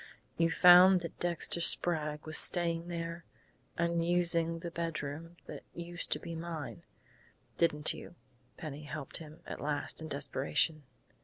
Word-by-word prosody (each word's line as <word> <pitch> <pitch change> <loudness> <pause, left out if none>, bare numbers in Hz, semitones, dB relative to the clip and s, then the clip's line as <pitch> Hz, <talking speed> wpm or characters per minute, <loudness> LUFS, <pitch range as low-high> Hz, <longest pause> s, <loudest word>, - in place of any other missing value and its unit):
"You 165 0 +2
found 180 +2 +7
that 170 - -8
Dexter 170 0 -1
Sprague 150 -3 +4
was 155 0 -3
staying 170 -1 +1
there, 170 0 -5 0.5
was 170 0 0
using 170 -1 +2
the 170 - -6
bedroom 165 0 -5
that - - -9
used 175 +1 -4
to - - -5
be 170 - -8
mine 160 - -6 0.8
didn't 150 -3 +2
you?" - - -11 0.4
Penny 150 -1 -8
helped 150 -2 -6
him 155 -1 -12
at - - -8
last, 145 +2 -4
in 160 - -6
desperation. 145 +2 -1
165 Hz, 140 wpm, -32 LUFS, 155-170 Hz, 0.8 s, found